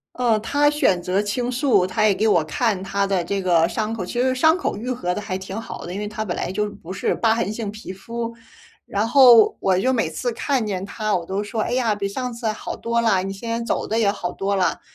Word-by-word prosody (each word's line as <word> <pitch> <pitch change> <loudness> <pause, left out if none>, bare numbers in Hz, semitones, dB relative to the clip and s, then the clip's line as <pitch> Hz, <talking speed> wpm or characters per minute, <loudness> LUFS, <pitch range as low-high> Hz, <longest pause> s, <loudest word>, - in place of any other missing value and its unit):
呃， 240 -3 +2
他 290 +5 +2
选 290 -12 +2
择 185 +3 0
倾 225 +4 -2
诉， 245 -7 +2
他 215 +3 +1
也 210 - +5
给 220 +3 +1
我 175 -7 +4
看 200 +5 -1
他 200 +1 -1
的 190 -3 0
这 195 +3 -2
个 175 -3 +3
伤 215 +3 -2
口。 205 -5 -4
其 240 - -4
实 260 +1 +2
伤 315 +6 +4
口 380 - -2
愈 230 +5 -5
合 180 -8 -2
得 210 - -3
还 185 -2 -3
挺 190 +2 -6
好 225 - -8
的， 175 - -6
因 195 - -4
为 210 - -3
他 215 +1 -4
本 175 - -3
来 - - -3
就 210 +2 -1
不 200 -4 -11
是 190 - -1
疤 225 -1 +2
痕 230 -2 -1
性 215 -2 -4
皮 215 -3 -8
肤。 230 +4 -5 0.5
然 205 +2 -1
后 240 -3 +7
我 185 -1 +2
就 260 +6 +1
每 225 -10 0
次 245 +10 -3
看 255 -2 -1
见 190 -2 -3
他， 215 +1 -2
我 175 -2 -2
都 190 +3 -2
说： 210 +2 -3
“哎 - - -3
呀， 240 -4 +1
比 200 -1 -3
上 250 +4 -4
次 230 0 -4
好 215 - -5
多 235 0 -1
了， 220 -5 +2
你 195 - -4
现 195 +4 -7
在 230 0 -1
走 230 - -2
得 220 - -1
也 215 -3 +3
好 180 -3 -5
多 195 +1 -2
了。” 185 - 0
210 Hz, 280 characters per minute, -22 LUFS, 190-235 Hz, 0.5 s, 后